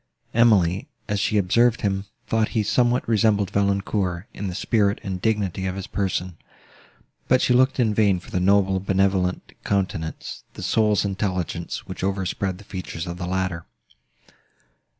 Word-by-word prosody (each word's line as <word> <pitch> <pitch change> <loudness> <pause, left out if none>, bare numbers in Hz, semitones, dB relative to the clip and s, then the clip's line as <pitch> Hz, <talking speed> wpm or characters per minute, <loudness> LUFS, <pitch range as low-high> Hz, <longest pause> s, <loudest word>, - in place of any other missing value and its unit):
Emily, 105 -6 +3 0.2
as 105 -2 -1
she 105 +1 +1
observed 115 +5 +3
him, 95 -2 -1 0.2
thought 110 -1 +1
he 110 - +3
somewhat 120 +4 +2
resembled 105 -3 +2
Valancourt, 100 -2 0
in 100 - -4
the 90 - -4
spirit 100 -1 +1
and 95 -2 -4
dignity 100 -4 0
of 90 - -3
his 95 -1 -5
person; 95 -3 -2 0.9
but 130 - +4
she 125 - +2
looked 130 +2 +3
in 110 -4 +3
vain 100 -3 +3
for - - -15
the 90 - 0
noble, 95 0 +3
benevolent 95 -1 0
countenance—the 95 -5 -3
soul's 105 -3 +2
intelligence, 95 -4 -3
which - - -7
overspread 95 -1 -1
the 105 - -13
features 90 -4 -6
of 85 0 -6
the 90 - -3
latter. 90 -2 -2
100 Hz, 150 wpm, -23 LUFS, 90-105 Hz, 0.9 s, but